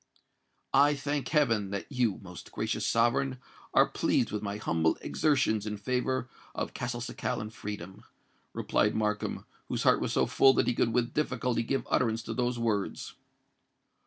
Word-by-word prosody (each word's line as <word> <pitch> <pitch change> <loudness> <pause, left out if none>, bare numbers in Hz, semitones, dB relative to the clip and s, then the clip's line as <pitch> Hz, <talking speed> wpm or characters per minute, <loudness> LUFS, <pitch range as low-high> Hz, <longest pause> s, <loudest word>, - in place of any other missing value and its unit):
"I 145 +2 +5
thank 140 -1 -2
heaven, 115 -10 +2
that 100 +8 -5
you, 120 -7 +1
most 90 -2 -10
gracious - - -2
sovereign, 130 +3 +2 0.3
are - - +6
pleased - - +1
with 105 - -2
my 100 0 -3
humble 80 -5 +1
exertions 130 -8 +1
in 105 0 -3
favour 125 +4 -1 0.3
of - - -3
Castelcicalan 120 -2 -3
freedom," 100 -4 -7 0.5
replied 105 - +1
Markham, 105 -1 -1 0.2
whose - - -2
heart - - +4
was - - -1
so - - +3
full 135 0 +5
that - - +3
he 125 - +2
could 115 - +1
with 120 0 0
difficulty 125 -5 0
give 135 +4 -1
utterance 115 -2 +1
to 115 - -4
those 125 +1 0
words. 110 -4 -2
115 Hz, 155 wpm, -30 LUFS, 105-130 Hz, 0.5 s, are